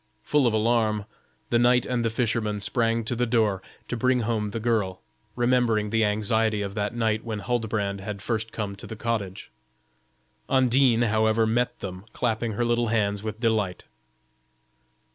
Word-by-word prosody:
Full 145 -4 +3
of 115 - +1
alarm, 110 -2 +1 0.5
the 120 - +4
knight 125 +1 +4
and 125 -2 -1
the 115 - +1
fisherman 110 -2 -1
sprang 115 +2 0
to 120 +2 -2
the 120 +1 0
door, 110 -5 +2 0.3
to - - -3
bring 125 +1 +2
home 110 -2 -1
the 115 - -4
girl, 110 -5 0 0.4
remembering 120 -4 +2
the 115 -1 +2
anxiety 105 0 +1
of 100 -1 -5
that 105 +2 -2
night 110 -2 0
when 110 -2 -4
Huldbrand 105 -4 -1
had 100 0 -5
first 110 +1 -2
come 100 -3 -4
to - - -9
the 110 - -6
cottage. 105 -4 -3 1.0
Undine, 130 -2 +4
however, 110 0 +2
met 120 +3 0
them, 90 0 -6
clapping 115 -1 -1
her 120 +4 0
little 120 0 +1
hands 105 -3 0
with 110 0 -5
delight. 110 -6 0
110 Hz, 160 wpm, -26 LUFS, 105-120 Hz, 1.0 s, the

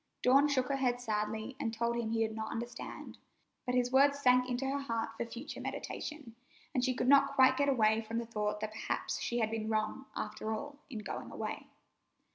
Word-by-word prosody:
Dawn 275 +3 +6
shook 260 -3 +1
her 275 - +1
head 245 -2 +1
sadly 220 +1 -2
and 225 - -1
told 235 +1 0
him 235 -2 -1
he 225 0 +2
did 220 0 -5
not 220 0 -3
understand, 235 +1 -6 0.5
but 250 - +1
his 245 0 +2
words 280 +2 +5
sank 250 -2 +4
into 250 +2 -1
her 275 +1 0
heart 230 -4 -2
for 235 - -3
future 240 +5 -7
meditation, 290 -7 -5 0.4
and 255 -4 +1
she 255 -1 +1
could 250 - -1
not 275 0 +6
quite 260 -1 +6
get 280 +1 +2
away 220 -4 +3
from 225 +1 -4
the 235 - -1
thought 210 -2 -2
that 215 0 -3
perhaps 220 - -2
she 240 - -1
had 220 -2 +1
been 220 -1 -2
wrong, 220 +5 -1
after 215 - -3
all, 285 +6 -5
in 220 -6 -6
going - - -5
away. - - -5
240 Hz, 210 wpm, -33 LUFS, 220-265 Hz, 0.5 s, Dawn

